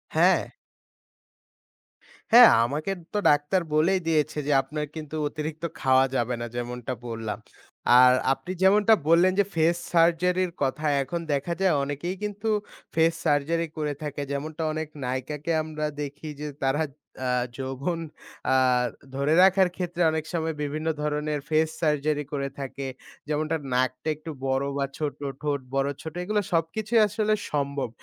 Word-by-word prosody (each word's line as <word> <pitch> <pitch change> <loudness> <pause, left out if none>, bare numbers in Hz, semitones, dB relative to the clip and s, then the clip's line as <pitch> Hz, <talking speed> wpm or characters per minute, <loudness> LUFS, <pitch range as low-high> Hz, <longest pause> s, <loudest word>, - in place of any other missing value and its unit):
হ্যাঁ। - - +5 1.9
হ্যাঁ 240 0 +10 0.2
আমাকে 150 +9 -2 0.2
তো - - 0
ডাক্তার 150 +6 +2
বলেই 180 +5 +3
দিয়েছে, 155 -1 +1
যে - - +1
আপনার 150 +3 -4
কিন্তু 155 -1 -6
অতিরিক্ত 155 +2 -5 0.2
খাওয়া 130 0 +5
যাবে 120 0 0
না - - -2
যেমনটা 120 +1 -4
বললাম। 115 -2 -4 0.6
আর 125 0 +8 0.2
আপনি 175 +6 -7
যেমনটা 205 +3 +5 0.2
বললেন 175 +3 +6
যে - - +6
ফেস 165 +1 +3 0.2
সার্জারির 175 +2 +3
কথা। 145 +3 -1 0.2
এখন 155 +6 -4
দেখা 140 +5 -1
যায় 190 -4 +4
অনেকেই 145 +6 -3
কিন্তু 210 +1 -3 0.5
ফেস 165 +1 +4
সার্জারি 160 +3 +1
করে 150 -1 -1
থাকে। 145 -1 -4
যেমনটা 155 +3 -3
অনেক 155 0 -3 0.2
নায়িকাকে 130 +5 -3
আমরা 155 -1 -4 0.2
দেখি 145 +2 -6
যে 150 - -4 0.2
তারা 135 +3 +1 0.5
আ - - +1 0.3
যৌবন 135 +6 -3 0.5
আ - - +4 0.6
ধরে 140 +3 +1
রাখার 190 -1 +5
ক্ষেত্রে 175 -1 -3
অনেক 160 -1 -1
সময় 160 -2 -1
বিভিন্ন 155 +2 -3
ধরনের 150 0 -1
ফেস 155 0 +3
সার্জারি 150 -1 +1
করে 140 -1 -2
থাকে। 135 0 -5 0.4
যেমন 150 +1 0
তার 160 -2 0
নাকটা 130 +4 0
একটু 155 +2 -8 0.2
বড় 135 +1 +1
বা 140 - +1
ছোট 150 -3 -2 0.3
ঠোঁট 145 -1 0
বড়-ছোট 140 +3 -2
এগুলা 210 +2 0
সবকিছুই 215 +8 +1
আসলে 215 +1 0 0.2
সম্ভব। 140 -3 -1
155 Hz, 145 wpm, -26 LUFS, 140-170 Hz, 1.9 s, হ্যাঁ